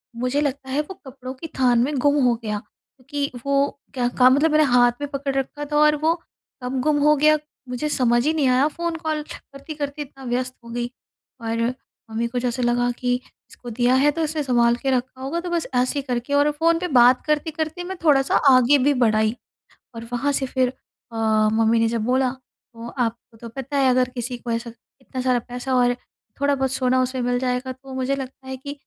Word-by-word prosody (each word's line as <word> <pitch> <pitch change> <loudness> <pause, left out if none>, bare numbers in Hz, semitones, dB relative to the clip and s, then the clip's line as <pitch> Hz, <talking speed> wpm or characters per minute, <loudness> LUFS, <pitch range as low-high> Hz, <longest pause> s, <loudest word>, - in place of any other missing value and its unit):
मुझे 250 +4 0
लगता 275 -2 -3
है 290 +3 +1
वो 345 +6 -8
कपड़ों 260 -1 -8
की 270 +5 -8
थान 245 -2 +4
में 295 +3 -1
गुम 285 0 +3
हो 240 -1 +3
गया, 210 -1 -2
क्योंकि 280 +6 -7
वो 280 0 +1
क्या 245 -2 0
का 255 0 +7
मतलब 295 +4 +3
मैंने 305 0 +5
हाथ 245 -3 +4
में 290 - -3
पकड़ 275 -1 -3
रखा 290 +2 -3
था 295 - +2
और 300 0 +5
वो 325 - +4 0.5
कब 255 +1 -2
गुम 300 +1 +2
हो 300 0 +5
गया, 305 +2 +4 0.3
मुझे 250 +5 -2
समझ 240 -3 +2
ही 315 - +2
नहीं 295 -4 +1
आया, 255 +3 +4
फ़ोन 340 +2 -3
कॉल 315 -2 -2
करती-करती 290 +1 -7
इतना 270 -1 -10
व्यस्त 250 +1 -2
हो 235 - -12
गई। 240 +1 -3 0.5
और 230 0 -2 0.5
मम्मी 230 +1 -1
को 245 +1 -3
जैसे 245 0 -2
लगा 245 0 +2
कि 245 -1 +1 0.4
इसको 245 - -11
दिया 245 +2 +2
है, 290 +3 +4
तो 325 +2 -3
इसने 305 -1 -1
सँभाल 240 -2 +3
के 265 +2 -2
रखा 260 +1 -2
होगा। 295 +6 -2
तो 350 0 -5
बस 340 -2 -1
ऐसे 250 +3 +1
ही - - -2
करके 245 +2 -2
और 290 +1 +4
फ़ोन 330 +2 +2
पे 360 - -2
बात 245 +1 +6
करते-करते 315 +2 -2
मैं 380 +1 -6
थोड़ा-सा 275 -4 +3 0.2
आगे 255 +3 +6
भी 290 +1 +4
बढ़ 220 -2 +4
आई। 220 +1 +1 0.6
और 230 0 -7
वहाँ 280 +4 0
से 270 -1 -1
फिर 255 -1 +1 0.4
अ, - - -7 0.4
मम्मी 225 +1 +3
ने 225 - +3
जब 230 0 -1
बोला, 255 +1 +2
तो 240 -2 -14
आपको 230 -1 -3
तो 230 +1 -9
पता 270 +4 -5
है 270 -1 +4
अगर 255 0 +3
किसी 245 0 -4
को 240 - -7
ऐसा 230 0 -2 0.3
इतना 260 0 -6
सारा 255 -1 +2
पैसा 250 +2 -3
और 245 0 +3 0.5
थोड़ा-बहुत 275 -2 +1
सोना 255 -1 +2
उसे 255 0 -2
मिल 245 0 +1
जाएगा, 250 +1 -2
तो 265 +1 -12
मुझे 260 +1 -1
लगता 265 0 -8
है 265 - -4
कि 280 +2 -7
260 Hz, 215 wpm, -22 LUFS, 245-290 Hz, 0.6 s, का